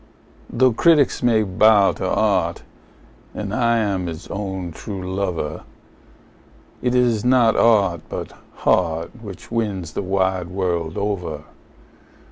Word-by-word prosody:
Though 130 +1 +3
critics 150 +1 +3
may 115 -3 +3
bow 100 +1 +4
to 95 - -4
art, 95 -6 0 0.7
and 105 -1 -4
I 115 -1 +2
am 100 -5 -1
its 80 +1 -7
own 95 -3 -4
true 95 +2 -6
lover, 90 -6 -3 1.2
It 125 0 0
is 120 -4 +2
not 125 -2 +4
art, 100 -8 +3
but - - -6 0.2
heart, 85 -2 0
which 100 -3 -10
wins 100 -9 -2
the - - -2
wide 95 -2 0
world 85 -3 -2
over. 90 -7 -3
100 Hz, 120 wpm, -21 LUFS, 90-110 Hz, 1.2 s, bow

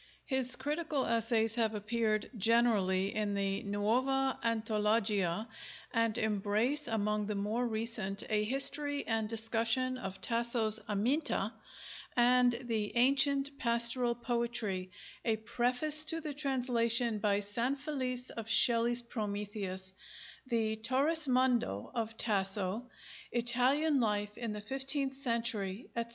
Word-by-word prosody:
His 260 -2 +2
critical 295 +1 -2
essays 230 -1 +1
have 225 -2 0
appeared 215 0 -1
generally 205 -4 +2
in 210 -1 -1
the 195 0 -1
Nuova 255 +7 0
Antologia, 215 -3 0 0.5
and 230 -2 +1
embrace 220 +7 0
among 210 -2 -1
the 210 - -2
more 215 +5 -1
recent 220 -3 -3
a 210 -1 +1
history 280 +4 +1
and 220 -1 -1
discussion 230 +3 0
of 195 -4 -6
Tasso's 230 -2 +2
'Aminta,' 230 +10 0 0.6
and 245 +1 +5
the 220 -3 -2
'Ancient 275 +2 +3
Pastoral 235 +1 +3
Poetry': 235 -6 -2 0.3
a 225 -2 +1
preface 250 +7 +1
to 325 +1 +2
the 300 -2 -5
translation 245 -5 +1
by 200 0 +1
Sanfelice 255 +4 -2
of 225 -1 -7
Shelley's 235 +1 +4
'Prometheus'; 205 -4 -5 0.5
the 220 -3 0
'Torrismondo' 255 - +1
of 225 -1 -3
Tasso: 200 +2 -1 0.4
'Italian 255 +5 +2
Life 210 -2 -1
in 235 -2 -4
the 210 0 -5
Fifteenth 270 +4 0
Century,' 230 -5 -2
etc. 235 0 -3
230 Hz, 110 wpm, -32 LUFS, 210-255 Hz, 0.6 s, and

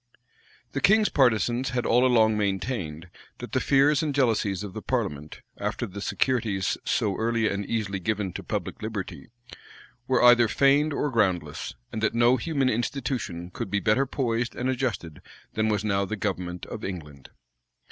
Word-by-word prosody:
The - - -3
king's 215 +1 +5
partisans 120 0 +2
had 125 -1 -2
all 120 +2 +4
along 110 -3 +4
maintained, 95 - -2 0.3
that - - -8
the - - +1
fears 140 +3 +3
and 150 -3 -2
jealousies 110 -7 +1
of 100 -3 -7
the 110 - -6
parliament, 95 - -3 0.2
after - - -2
the 100 +2 -8
securities 110 -6 0
so 100 -3 0
early 115 -1 +1
and 100 0 -2
easily 100 -2 -2
given 100 -1 -2
to - - -5
public - - -4
liberty, 110 -3 -5 0.8
were 130 -2 +2
either 120 -1 +7
feigned 140 +6 +3
or 145 0 -1
groundless; 100 -7 -1 0.2
and 110 - -4
that 110 - +1
no 120 +2 +4
human 140 0 0
institution 120 - -2
could 95 - -5
be 100 - +1
better 115 +7 +2
poised 120 -3 -1
and 125 +1 -2
adjusted 110 - -3 0.3
than 110 0 +1
was 105 -1 0
now 100 -2 +1
the 110 +3 -3
government 90 -3 -3
of - - -8
England. 75 -8 -7
110 Hz, 165 wpm, -26 LUFS, 100-130 Hz, 0.8 s, either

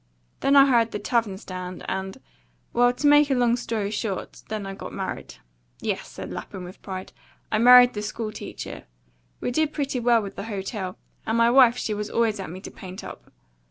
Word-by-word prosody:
Then 275 - +3
I 275 -1 +9
hired 235 -4 +3
the - - -1
tavern 210 -2 0
stand, 185 -2 -7
and 190 +4 -4 0.5
well 245 +1 +4
to 250 +4 -5
make 290 0 +6
a 270 - +2
long 240 -1 +3
story 220 -4 -3
short, 210 -3 -4
then 215 -2 -3
I 195 - -5
got - - -8
married. - - -5 0.4
Yes," - - -3
said - - -8
Lapham, 185 - -7
with 180 +2 -11
pride, 185 -1 -7 0.4
"I 215 - +2
married 245 +1 +8
the 210 - -4
school 215 +1 -4
teacher. - - -8 0.6
We - - -1
did 310 +4 +1
pretty 275 -3 -2
well 235 -2 +3
with 200 - -8
the 200 - -5
hotel, 195 -3 -4 0.3
and 225 - +1
my 230 0 +5
wife 250 -2 +6
she 215 - -2
was 210 0 -4
always 225 -3 +1
at 190 - -5
me 185 +3 -8
to - - -9
paint 185 0 -9
up. - - -10
220 Hz, 200 wpm, -25 LUFS, 195-245 Hz, 0.6 s, I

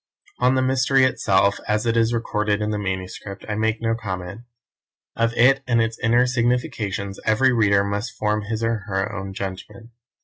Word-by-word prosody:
On 125 +1 +3
the 130 - +2
mystery 130 +1 +3
itself, 100 -5 +2
as 105 +1 0
it 115 0 +1
is 115 0 +3
recorded 105 -3 -1
in 105 0 -1
the 105 - -2
manuscript, 95 0 -5
I 105 - -2
make 110 +1 0
no 115 0 +1
comment. 95 -2 -5 0.7
Of 115 0 +1
it 135 +4 +4
and 120 -2 +2
its 115 0 -1
inner 120 +2 +3
significations 115 -5 -1
every 125 +4 +3
reader 100 -4 +3
must 100 +4 -4
form 105 0 0
his 110 +2 -4
or 115 0 +1
her 95 +1 -2
own 95 0 -5
judgment. 100 +4 -7
110 Hz, 175 wpm, -22 LUFS, 100-120 Hz, 0.7 s, it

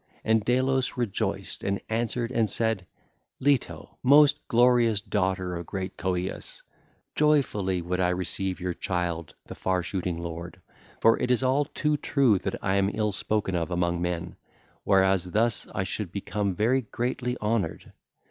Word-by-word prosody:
And 110 -1 +2
Delos 130 +2 +1
rejoiced 120 -5 -2
and 100 0 -1
answered 115 +1 -1
and 115 -4 +1
said: 110 -3 0 0.5
'Leto, 140 -2 0
most 145 +2 +6
glorious 120 -3 +4
daughter 95 -3 -1
of 85 -1 -6
great 95 -1 -4
Coeus, 90 0 -4 0.5
joyfully 105 - +1
would 90 +1 -2
I 90 -1 +2
receive 90 +1 -2
your 90 -1 -2
child 85 -3 -3
the - - -8
far 95 -1 -1
shooting 90 -2 -3
lord; 85 0 -7 0.4
for 115 - +5
it 125 - -1
is 125 +1 +2
all 135 +3 +2
too 150 +1 -1
true 135 -8 +2
that 95 - -3
I 95 0 +1
am 100 0 +2
ill 105 -1 0
spoken 105 -1 -1
of 85 -1 -1
among 85 -1 0
men, 85 -1 -3 0.5
whereas 95 -2 +3
thus 110 +5 +2
I 95 - -3
should 95 0 -4
become 100 0 -2
very 120 +7 +2
greatly 125 +1 -3
honoured. 105 -5 -2
100 Hz, 150 wpm, -27 LUFS, 90-120 Hz, 0.5 s, most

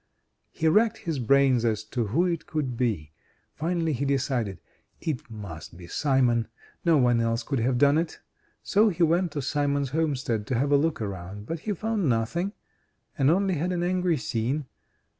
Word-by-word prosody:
He 160 - -1
racked 215 +7 +4
his 160 -5 -3
brains 130 0 +4
as 110 -2 0
to 115 +1 -2
who 155 - +2
it 170 -3 -2
could 140 -6 -2
be. 105 - -1 0.4
Finally 165 0 -1
he 135 +1 -2
decided: 125 - -1 0.4
"It 145 -7 -4
must 100 -7 -8
be 90 - -10
Simon 120 - +2 0.4
no 165 -3 +4
one 120 -3 +3
else 115 +1 0
could 135 +1 -1
have 125 +2 +1
done 145 +4 +5
it." 165 -1 -4 0.4
Se 215 +2 +4
he 170 - +1
went 170 +1 +2
to 145 - -3
Simon's 140 -1 0
homestead 130 -9 -1
to 130 - 0
have 140 +4 +1
a - - +6
look 150 -4 +1
around, 100 +1 -6
but 165 +7 -4
he 210 +6 -2
found 210 -4 -1
nothing, 145 - 0 0.6
and 135 -3 +3
only 190 +3 +2
had 175 +5 -1
an 175 -1 -1
angry 180 -2 +1
scene. 125 +4 -2
140 Hz, 180 wpm, -26 LUFS, 115-165 Hz, 0.6 s, a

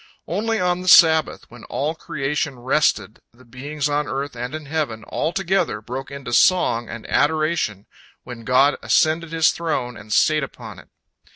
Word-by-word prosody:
Only 220 +5 -1
on 180 0 0
the 185 - -8
Sabbath, 160 -4 +5
when 120 -1 -13
all 150 +3 -2
creation 140 -2 -3
rested, 130 -3 0
the 125 +2 -20
beings 140 +5 -4
on 145 0 -1
earth 140 0 -4
and 125 +4 -5
in 155 -1 -7
heaven, 140 -7 -3
all 160 - -2
together, 190 - -1
broke 125 +5 -7
into 140 -3 -7
song 120 -8 +3
and 115 - -8
adoration 155 - 0 0.4
when 120 -2 -9
God 130 +5 +3
ascended 160 +1 +1
His 160 -1 +3
throne 130 -7 -3
and 105 0 -12
sate 155 +7 +3
upon 135 - -8
it. - - -17
145 Hz, 165 wpm, -21 LUFS, 125-160 Hz, 0.4 s, Sabbath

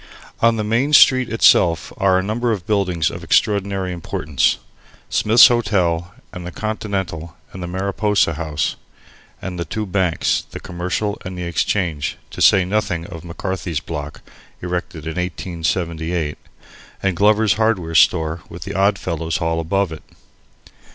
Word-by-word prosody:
On 115 0 +4
the 110 - -2
Main 120 +8 0
Street 130 -4 +6
itself 85 - +4
are 95 -1 +3
a 95 - 0
number 115 +4 -1
of 100 -6 -3
buildings 90 -6 +1
of - - -8
extraordinary 100 -3 +1
importance, 80 -4 0 0.5
Smith's 110 +3 +7
Hotel 90 -7 0 0.2
and 90 - -7
the 90 - -6
Continental 95 -6 -4 0.2
and 95 - -8
the 90 - -4
Mariposa 100 0 0
House, 75 -1 -2 0.7
and 90 -2 -5
the - - -1
two 105 +7 -4
banks 95 -3 0
(the - - -8
Commercial 90 +4 -3
and 90 0 -6
the 90 - -4
Exchange), 85 -3 -1
to - - -7
say 95 -2 +6
nothing 95 -4 -1
of 85 -2 -9
McCarthy's 90 -2 -4
Block 75 -2 -7 0.4
(erected 90 -3 -4
in 80 +1 -5
1878), 85 -2 -2 0.7
and 95 -2 +1
Glover's 105 +2 +4
Hardware 110 -7 0
Store 80 0 +3
with 85 -1 -8
the - - -6
Oddfellows' 85 -5 0
Hall 80 0 -1
above 95 +2 0
it. 80 - -8
90 Hz, 145 wpm, -20 LUFS, 85-100 Hz, 0.7 s, Smith's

